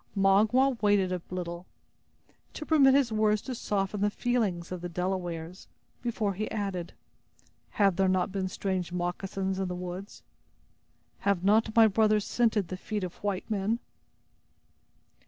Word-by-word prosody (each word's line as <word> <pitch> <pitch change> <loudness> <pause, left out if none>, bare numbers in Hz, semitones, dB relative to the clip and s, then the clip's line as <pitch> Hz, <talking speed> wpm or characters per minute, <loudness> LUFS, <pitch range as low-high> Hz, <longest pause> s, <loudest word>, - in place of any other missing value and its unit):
Magua 220 +7 +3
waited 205 -3 +3
a 180 -1 -2
little, 175 -1 -5 0.9
to 305 - -6
permit 275 -4 +5
his 275 -4 +3
words 215 -1 +2
to 260 - -4
soften 200 -3 -2
the 205 - +3
feelings 205 -7 -1
of 180 -2 -5
the 175 - -4
Delawares, 180 -1 -4 0.3
before 220 -4 -1
he 215 +3 -3
added: 195 -5 -3 0.8
"Have 195 -4 +3
there 195 0 +3
not 185 +1 +1
been 190 -1 -2
strange 185 -2 -3
moccasins 190 +2 -2
in 190 - -1
the 180 - -4
woods? 180 +3 -7 1.0
Have 200 -3 0
not 220 +2 +3
my 225 -1 +8
brothers 215 0 +3
scented 220 -6 +1
the 185 - -4
feet 210 +1 -4
of 180 -1 -5
white 200 -2 -2
men?" 215 +1 0
195 Hz, 145 wpm, -29 LUFS, 180-215 Hz, 1.0 s, my